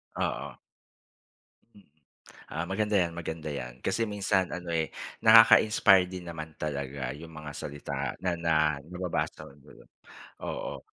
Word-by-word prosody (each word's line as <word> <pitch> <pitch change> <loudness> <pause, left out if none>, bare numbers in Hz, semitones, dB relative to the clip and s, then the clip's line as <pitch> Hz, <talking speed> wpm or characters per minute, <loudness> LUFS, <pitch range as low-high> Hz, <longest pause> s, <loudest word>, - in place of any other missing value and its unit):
Oo. - - -3 1.7
Mm. - - -19
Ah, 80 +2 -3
maganda 105 +3 -1
'yan 85 -3 +1
maganda 80 -2 -5
'yan. 60 -3 -6
Kasi 115 +4 +1
minsan 95 -2 +1
ano, 90 -1 -6
eh, 80 -1 0 0.3
nakaka-inspire 110 -4 +7
din 90 -1 -7
naman 80 -2 -7
talaga 70 -3 -4
'yong 80 +3 -10
mga 75 -1 -8
salita 70 -1 -4
na 90 -2 0
na 85 -1 +1 0.3
nababasa 90 +3 -4
hun 70 - -16
dulo, 70 - -17 0.6
oo. - - -5
85 Hz, 130 wpm, -29 LUFS, 75-95 Hz, 1.7 s, nakaka-inspire